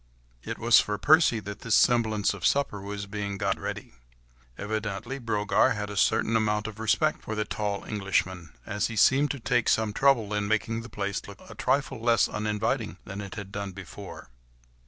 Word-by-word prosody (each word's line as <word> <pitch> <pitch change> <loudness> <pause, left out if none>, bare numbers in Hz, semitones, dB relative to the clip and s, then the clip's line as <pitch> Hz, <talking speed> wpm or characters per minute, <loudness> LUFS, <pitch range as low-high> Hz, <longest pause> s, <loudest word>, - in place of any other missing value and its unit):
It - - -5
was 115 0 +6
for 105 0 -1
Percy 145 - +4
that 100 +1 -7
this 115 - +1
semblance 110 -4 +3
of 100 -4 -9
supper 140 -8 +1
was 100 0 -5
being 100 0 -4
got - - -1
ready. - - -6 0.6
Evidently 110 +5 -4
Brogard 105 -4 +2
had 105 -1 -4
a - - -6
certain 110 +3 +2
amount 105 -1 +1
of 110 -1 -7
respect 110 -1 +1
for 110 - -5
the 105 0 -1
tall 100 -2 -3
Englishman, 95 -4 -2 0.2
as 105 +1 -1
he 115 - -6
seemed 135 +7 +4
to 140 - -3
take 120 -1 +1
some 110 -1 +2
trouble 120 -5 +3
in 105 -1 -1
making 110 +2 0
the 120 - -10
place 100 -1 -3
look - - -11
a - - -10
trifle 135 -2 0
less 115 -1 +3
uninviting 105 +1 -2
than 100 +2 -6
it 100 0 -8
had 100 -2 -7
done 100 -1 -5
before. 95 -7 -10
105 Hz, 185 wpm, -27 LUFS, 100-115 Hz, 0.6 s, was